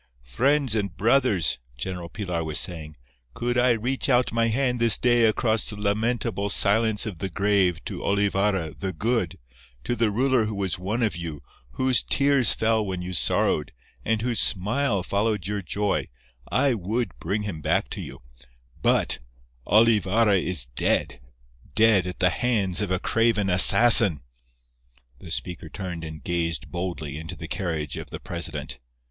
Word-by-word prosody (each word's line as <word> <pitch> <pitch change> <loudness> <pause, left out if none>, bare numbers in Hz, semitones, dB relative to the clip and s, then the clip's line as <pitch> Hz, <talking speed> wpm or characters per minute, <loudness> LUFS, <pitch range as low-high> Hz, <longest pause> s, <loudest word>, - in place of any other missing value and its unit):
"Friends 135 - +1
and 100 -3 -3
brothers," 105 - +2 0.2
General 90 +3 -6
Pilar 90 -6 -4
was 80 -1 +3
saying, 80 -3 -1 0.4
"could 120 +1 -2
I 125 0 +3
reach 125 +5 -2
out 125 -1 +2
my 115 0 +1
hand 125 +1 0
this 115 -1 +7
day 120 -1 +3
across 110 0 +1
the 105 - -1
lamentable 105 0 -1
silence 105 +2 +3
of 100 -7 -7
the 95 - -4
grave 95 -2 0
to - - -6
Olivarra 100 -4 0
'the 95 -2 -4
Good,' 110 -1 -2 0.5
to 120 - -2
the 115 -2 +1
ruler 125 +2 +1
who 110 0 -5
was 95 -3 -3
one 105 +6 -2
of 105 -7 -1
you, 85 -4 -7 0.3
whose 130 -1 +2
tears 140 -2 +3
fell 110 0 +1
when 95 -3 -5
you 90 +1 -6
sorrowed, 75 -2 +1 0.3
and 110 -1 -1
whose 120 -2 0
smile 105 +1 0
followed 105 0 -1
your 105 +1 -3
joy—I 80 - -2
would 115 +4 -3
bring 105 +1 -3
him 95 -7 -6
back - - 0
to - - -5
you, - - -10 0.6
but—Olivarra 95 - +1
is 85 -9 0
dead—dead 65 - 0
at 90 - -6
the 90 -1 +3
hands 105 -5 0
of 105 - -2
a 95 - 0
craven 110 -1 0
assassin!" 100 - +7 1.0
The 85 - -12
speaker 85 0 -4
turned 90 -2 -7
and 80 -1 -9
gazed 85 -1 -2
boldly 85 -5 -5
into 80 0 -8
the - - -9
carriage 80 -5 -4
of - - -8
the - - -8
president. 75 -6 -4
100 Hz, 155 wpm, -24 LUFS, 85-115 Hz, 1.0 s, this